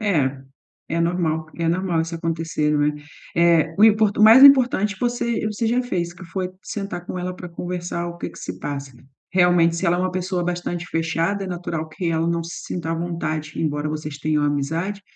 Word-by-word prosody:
É, 145 -11 +1 0.5
é 165 +1 -1
normal, 165 -2 0
é 165 -1 -1
normal 175 -1 0
isso 165 +1 -3
acontecer, 165 -2 -1
não 145 -1 +2
é? 150 0 +1 0.4
Eh, 165 -1 +4
o 210 - +7
impor 215 -1 +5
o - - +4
mais 225 +5 +9
importante 250 -7 +6
você 240 -2 -1
você 215 +2 -2
já 245 +3 +2
fez 175 -8 -2
que 185 - -11
foi 185 +2 -3
sentar 195 -5 -5
com - - -4
ela 180 0 -4
pra 180 0 -8
conversar 175 0 -4
o 170 - -8
que - - -5
que - - -14
se 90 0 -6
passa 140 +3 -5 0.4
realmente, 175 -2 +4
se 190 - -1
ela 170 +1 +3
é - - -1
uma 185 0 0
pessoa 185 -1 -2
bastante 175 0 -3
fechada, 165 +4 -1
é - - -5
natural 170 -3 -4
que 165 +2 -3
ela 165 0 0
não 170 0 0
se 170 - -7
sinta 170 -2 -4
à - - 0
vontade, 165 -2 -3
embora 150 -1 -1
vocês 150 -1 -5
tenham 150 0 0
amizade, 160 +8 -1
170 Hz, 205 wpm, -22 LUFS, 160-185 Hz, 0.5 s, mais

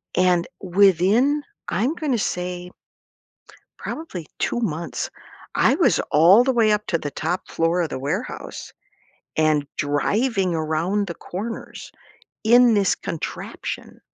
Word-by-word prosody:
And 180 -1 +3
within, 200 - +3 0.2
I'm 245 - 0
gonna 295 -8 -1
say, 180 -2 -3 1.1
probably 185 - -6
2 240 - -1
months, 170 -6 -3 0.5
I - - +4
was - - +3
all 180 +10 +7
the 265 0 +1
way 225 -3 +4
up 210 0 +1
to 165 - +1
the 145 - -5
top 175 +4 -3
floor 165 +2 +1
of 160 - -1
the - - -4
warehouse 140 +2 -5 0.6
and 155 -2 +2
driving 190 - 0
around 165 +6 0
the 170 - -5
corners 215 +6 -7 0.5
in 240 +1 +6
this 200 -2 +3
contraption. 165 - -6
185 Hz, 125 wpm, -22 LUFS, 165-225 Hz, 1.1 s, all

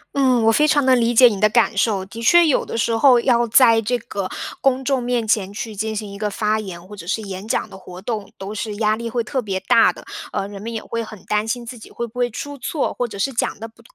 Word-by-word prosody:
嗯， 255 -4 +3
我 225 - +5
非 300 +7 +3
常 290 -2 +3
地 260 -1 +5
理 235 -1 +1
解 250 +2 +9
你 205 -4 -2
的 215 - +5
感 235 0 +2
受， 195 -1 +1
的 225 +4 -9
确 345 +9 +6
有 300 - +2
的 - - -5
时 230 0 +1
候 245 +1 +5
要 235 -1 +2
在 230 -1 +5
这 245 +3 0
个 200 -5 -5 0.3
公 265 -1 +1
众 270 -1 +1
面 240 -2 -1
前 200 -3 +1
去 215 +1 -6
进 220 +2 -3
行 210 -1 -5
一 200 - -9
个 210 -1 -1
发 215 +1 0
言 185 -4 -8
或 210 - -10
者 170 -4 -11
是 220 +4 -2
演 195 0 -7
讲 - - -1
的 - - -13
活 180 -1 -11
动， 215 -3 -4
都 195 +2 -6
是 215 0 -4
压 215 0 +1
力 230 +1 -5
会 235 +1 -1
特 260 +3 -2
别 195 -4 -3
大 190 - +4
的， - - -14 0.3
呃， 195 - -2
人 200 -1 -9
们 230 +2 -5
也 225 -1 -5
会 230 0 -4
很 215 -3 -11
担 210 +1 0
心 240 +1 -3
自 240 0 -9
己 - - -13
会 235 - -4
不 235 +2 -10
会 245 0 +1
出 285 +5 -7
错， 290 +4 -2
或 245 - -2
者 215 - -9
是 265 +7 -1
讲 230 - -1
得 225 - -6
不 230 +1 -21
225 Hz, 300 characters per minute, -20 LUFS, 205-245 Hz, 0.3 s, 解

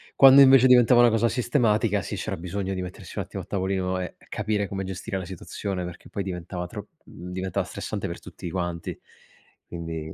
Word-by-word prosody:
Quando 135 +1 +9
invece 130 -1 +8
diventava 125 -1 +6
una 120 - +7
cosa 115 +1 +2
sistematica, 115 -4 +1
sì, - - -5
c'era - - -4
bisogno 95 +3 -4
di 95 - -3
mettersi 90 0 -9
un - - 0
attimo - - -6
a - - -14
tavolino 95 -1 -1
e 90 - -5
capire 105 -1 -1
come 95 -1 -4
gestire 95 +2 -5
la 95 - -5
situazione 95 +1 -5
perché 90 -1 -10
poi 100 - -3
diventava 90 -1 -5
tro - - -8 0.2
mhmm, 90 +2 -10
diventava 95 0 -2
stressante - - -5
per - - -6
tutti 85 - -8
quanti. 85 -2 -4 0.7
Quindi 80 -2 -6
95 Hz, 190 wpm, -25 LUFS, 90-110 Hz, 0.7 s, Quando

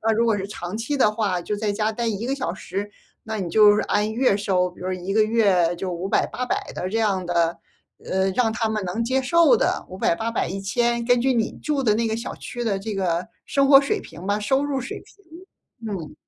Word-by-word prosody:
啊， 225 - +1
如 230 - +3
果 225 - +3
是 195 0 -4
长 180 -2 -6
期 260 +6 -2
的 215 -6 +3
话 205 -5 -1
就 210 - -3
在 210 0 -1
家 215 +1 0
待 235 +1 -3
1 220 +1 -2
个 270 - 0
小 265 -11 -3
时， 200 +2 -5 0.3
那 220 0 -4
你 185 -4 -3
就 210 +2 +6
是 - - +1
按 210 +1 0
月 245 -2 +2
收， 185 -3 +1
比 180 - -18
如 185 - -3
1 185 +2 -4
个 220 - +4
月 200 -6 +2
就 185 0 -4
500、 180 +3 0
800 250 0 -3
的 180 - -3
这 225 +4 -1
样 195 -4 +1
的， 170 -1 +1 0.5
呃， 190 0 0
让 225 +3 +1
他 225 0 -1
们 215 -1 -2
能 220 +6 -2
接 260 +2 +1
受 315 -1 +5
的， - - 0
500、 185 -2 0
800、 230 -4 -2
1000 235 +5 -1
根 245 0 +3
据 265 +2 +2
你 225 -2 0
住 295 -2 0
的 215 -5 +3
那 230 +1 0
个 220 - -1
小 230 - -5
区 240 -1 -6
的 210 -4 0
这 215 +2 -5
个 180 -1 -1 0.2
生 275 -1 +2
活 275 - +9
水 275 - -1
平 165 +3 -11
吧， 205 +1 0
收 265 +7 +1
入 280 -2 -1
水 250 - -6
平， 335 - -13
嗯。 165 -5 -7
215 Hz, 225 characters per minute, -23 LUFS, 190-235 Hz, 0.5 s, 活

